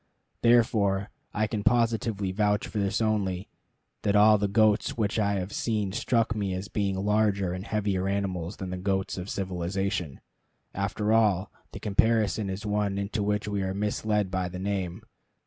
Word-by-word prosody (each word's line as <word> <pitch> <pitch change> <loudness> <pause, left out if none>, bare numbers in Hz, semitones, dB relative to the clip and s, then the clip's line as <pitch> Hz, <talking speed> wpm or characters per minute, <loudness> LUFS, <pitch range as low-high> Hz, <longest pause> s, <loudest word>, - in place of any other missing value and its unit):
Therefore, 105 -4 +3 0.2
I 110 - 0
can 105 -1 -3
positively 115 -4 +1
vouch 105 +1 +1
for 105 - -3
this 100 +2 0
only, 100 -4 0 0.5
that 100 - +1
all 105 0 +6
the 100 - +1
goats 110 +2 +2
which 110 0 0
I 100 -1 +2
have 95 0 -3
seen 105 -4 -1
struck 115 +2 +1
me 100 -3 -2
as 95 +3 -5
being 100 -2 -1
larger 100 -2 +1
and 90 +1 -5
heavier 100 -3 0
animals 95 -2 -2
than 95 -1 -5
the 90 - -3
goat 95 +1 -1
of 90 +2 -6
civilization. 90 -4 -2 0.5
After 105 +2 0
all, 105 -4 +3 0.2
the - - -8
comparison 110 0 +2
is 95 +2 -5
one 105 -1 0
into 100 +2 -2
which 105 0 0
we 100 -1 -1
are 95 0 -2
misled 105 -1 0
by 95 -1 -1
the 90 - -7
name. 95 0 -3
100 Hz, 165 wpm, -27 LUFS, 95-105 Hz, 0.5 s, all